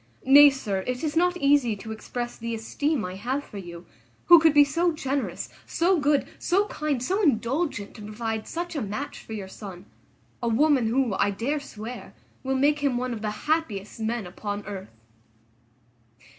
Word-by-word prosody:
Nay, 285 +2 +9
sir, 205 -9 -3
it 250 +2 -2
is 305 -1 -1
not 355 +2 +3
easy 280 -7 +3
to 220 +2 -8
express 240 +2 -5
the 230 0 -4
esteem 270 +3 -1
I 180 - -5
have 260 +7 -2
for 205 - -9
you; 175 -2 -9 0.4
who 345 -1 +9
could 320 0 +5
be 290 0 +7
so 335 +5 +1
generous, 280 -3 -3 0.2
so 350 +1 +2
good, 290 -1 +2
so 390 +3 +2
kind, 295 -5 -2
so 385 +10 0
indulgent 270 - 0
to - - -11
provide 220 +1 -4
such 345 0 -4
a 290 - -1
match 215 +8 -5
for 225 - -9
your 200 -3 -5
son; 190 -2 -10 0.6
a 240 - -1
woman, 260 +1 +3
who, 245 -1 +1
I 200 +1 +2
dare 240 +9 -1
swear, 240 -3 -9 0.3
will 265 0 -1
make 290 +2 +3
him 280 -4 +1
one 250 0 -2
of 220 - -6
the 215 - -1 0.2
happiest 240 -12 -1
men 225 -1 -2
upon 205 +3 -5
earth." 195 -1 -7
250 Hz, 180 wpm, -26 LUFS, 215-295 Hz, 0.6 s, Nay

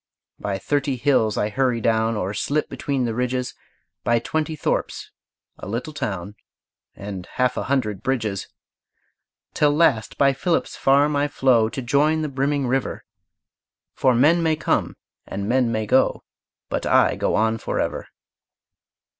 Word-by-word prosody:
By 100 -1 -2
thirty 140 +7 -1
hills 120 -4 +2
I 105 - 0
hurry 125 +1 0
down, 115 0 +1
Or 100 0 -2
slip 145 +8 -1
between 135 -3 -2
the 115 - -2
ridges; 125 +1 -2 0.5
By 120 - +3
twenty 155 +6 -2
thorps, 150 - -2 0.5
a - - -8
little 120 +9 -4
town, 100 - -4 0.6
And 100 -2 -7
half 125 0 +1
a - - -3
hundred 110 -8 -1
bridges. 110 -6 -2 1.1
Till 150 -1 +3
last 130 -9 +2
by 140 -1 +4
Philip's 165 +5 -1
farm 145 +2 +3
I 145 +1 +2
flow 125 -6 +3
To 130 - -5
join 150 +5 +2
the 150 - -2
brimming 140 +1 0
river; 130 +1 -1 0.9
For 130 -2 +2
men 155 +8 +4
may 160 -1 +2
come 150 - -1 0.3
and 100 +1 -4
men 125 0 +2
may 110 -1 -1
go, - - +2 0.4
But - - -3
I - - +4
go - - 0
on 110 +1 +1
forever. - - -3
125 Hz, 145 wpm, -22 LUFS, 110-140 Hz, 1.1 s, by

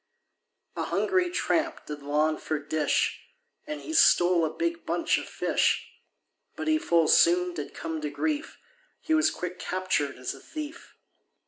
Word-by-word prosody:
A - - -2
hungry 370 -2 +1
tramp 335 -2 -1
did 150 -1 -7
long 150 +2 +1
for 155 - -2
dish, 150 +1 0 0.5
And 300 0 -5
he 320 - -6
stole 175 - +5
a 160 - +1
big 335 - -2
bunch - - +1
of - - -8
fish, - - 0 0.6
But 320 - -5
he 310 0 +3
full 170 - +2
soon 180 +2 +4
did 150 -4 -6
come 160 -1 -4
to 150 - -2
grief, 305 - -2 0.4
He 320 - -1
was 315 0 +4
quick 180 0 -6
captured 185 -6 -1
as 125 0 -4
a - - -12
thief. 310 +1 -8
180 Hz, 155 wpm, -27 LUFS, -, 0.6 s, stole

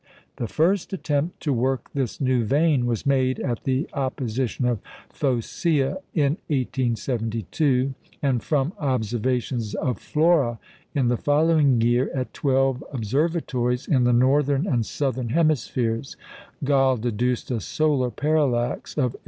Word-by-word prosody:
The 120 - -2
first 180 - +1
attempt 155 -2 -2
to 145 - 0
work 130 +2 -1
this 135 -5 -2
new 130 -3 +2
vein 140 +1 +2
was 115 -3 -2
made 130 -2 +2
at 120 -5 -3
the 135 +3 0
opposition 130 -3 -2
of 120 -3 +1 0.3
Phocæa 140 +4 0
in 150 0 +2
1872; 125 - 0 0.3
and 130 -5 +1
from 150 +2 0
observations 120 -3 -1
of 125 -6 -2
Flora 150 -7 +2 0.4
in 130 -4 +2
the 120 - +1
following 145 -3 +3
year 120 +3 +2
at 130 -1 -3
twelve 135 -1 +1
observatories 130 0 -1
in 130 -4 +3
the 125 - +4
northern 135 +4 +3
and 120 - 0
southern 130 -4 -2
hemispheres, 130 -5 0 0.5
Galle 135 -2 +3
deduced 120 +2 -1
a 120 - 0
solar 140 +2 +1
parallax 140 -4 0
of 125 -5 +1
8·87". - - -11
130 Hz, 130 wpm, -24 LUFS, 120-145 Hz, 0.5 s, the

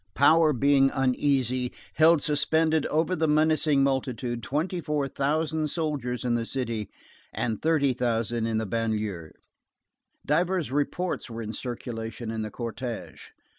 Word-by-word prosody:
Power 155 +2 +5
being 135 0 +4
uneasy, 130 -2 +1 0.2
held 160 -1 +5
suspended 155 +1 +2
over 160 +4 +1
the 160 -1 +1
menacing 155 -2 +3
multitude 125 -3 -1
twenty 165 +8 -2
four 150 -3 -1
thousand 155 +3 0
soldiers 140 -7 -2
in 120 - +1
the 120 -1 0
city 115 -4 -3 0.4
and 110 -3 -2
thirty 150 -4 +2
thousand 115 -2 -1
in 110 -1 0
the 110 - -1
banlieue. 105 -6 -2 1.0
Divers 175 +1 +1
reports 145 +3 -1
were 115 0 -5
in 110 +1 -5
circulation 115 -2 -5
in 110 -1 -3
the 110 - -3
cortège. 120 +1 -6
135 Hz, 130 wpm, -27 LUFS, 115-155 Hz, 1.0 s, Power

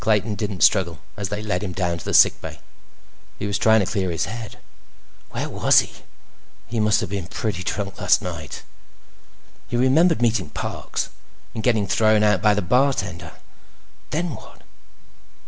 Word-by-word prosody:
Clayton 110 0 +1
didn't 105 -3 -2
struggle 85 -3 +3 0.2
as 100 -2 -4
they 105 +1 -4
led 95 -4 -1
him 95 -3 -4
down 85 -2 -1
to - - -11
the - - -3
sick - - +6
bay. - - -8 0.8
He - - -4
was 100 0 -1
trying 110 -1 +5
to - - 0
clear 95 -1 -1
his 80 -2 -1
head. 110 +2 -7 0.7
Where - - -4
was - - +4
he? - - -9 0.7
He 115 - -3
must 105 +1 +3
have 110 - -4
been 100 -4 -3
pretty 105 -3 -3
drunk 100 +1 -4
last 100 - +4
night. 85 -5 -7 1.0
He 120 - -2
remembered 155 +7 +4
meeting 115 -5 +1
Parks. - - -4 0.4
And 110 - -4
getting 110 -3 +2
thrown 110 +2 +3
out 105 -3 +3
by 105 -1 +4
the 105 - -1
bartender. 100 -5 0 0.8
Then 165 +1 -2
what? 110 - -13
105 Hz, 165 wpm, -22 LUFS, 95-110 Hz, 1.0 s, sick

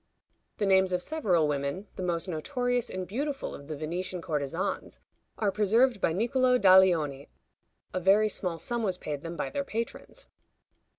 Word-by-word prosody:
The 210 - 0
names 190 -1 +4
of 180 0 0
several 190 - +1
women, 140 +6 -2
the - - -6
most 175 0 -1
notorious 245 - -1
and 185 -1 -5
beautiful 275 +6 -3
of 140 - -10
the 155 -1 -5
Venetian 175 +4 -4
courtesans, 165 +3 -3 0.4
are 205 -2 +1
preserved 220 +3 +2
by - - +2
Nicolo 250 +7 +2
Daglioni. 180 - +4 0.6
A 185 - 0
very 195 +4 +4
small 180 -4 -3
sum 235 +9 -2
was 190 -5 -1
paid 145 -5 -5
them 165 +1 -6
by - - -3
their 285 -1 -2
patrons. 230 -3 -5
185 Hz, 160 wpm, -28 LUFS, 165-225 Hz, 0.6 s, names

